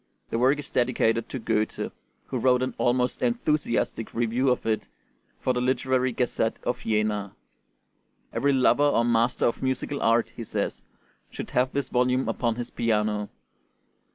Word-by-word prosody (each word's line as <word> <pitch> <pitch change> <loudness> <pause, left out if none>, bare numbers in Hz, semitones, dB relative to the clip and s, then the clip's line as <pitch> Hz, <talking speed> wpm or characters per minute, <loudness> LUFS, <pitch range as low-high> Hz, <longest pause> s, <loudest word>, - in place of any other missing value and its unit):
The 115 - 0
work 130 +4 +4
is 145 - -7
dedicated 115 -2 +1
to - - -4
Goethe, 110 -2 -1 0.3
who 130 - -3
wrote 125 +1 +3
an 130 - -2
almost 125 +1 +1
enthusiastic 150 - 0
review 120 +3 +1
of 125 - 0
it 110 -1 0 0.5
for 130 - +1
the 125 - -1
Literary 130 0 +1
Gazette 115 -2 0
of 125 0 -1
Jena. 105 -3 -1 1.0
"Every 140 - +2
lover 135 +1 +4
or 145 -5 +3
master 120 +1 +2
of 120 - 0
musical 130 +2 -2
art," 115 +1 +2
he 115 - -5
says, - - -3 0.5
"should - - -7
have 125 +1 +2
this 140 -2 -2
volume 125 +1 +1
upon 115 -2 0
his 120 0 -5
piano." 105 -2 0
125 Hz, 155 wpm, -26 LUFS, 115-130 Hz, 1.0 s, work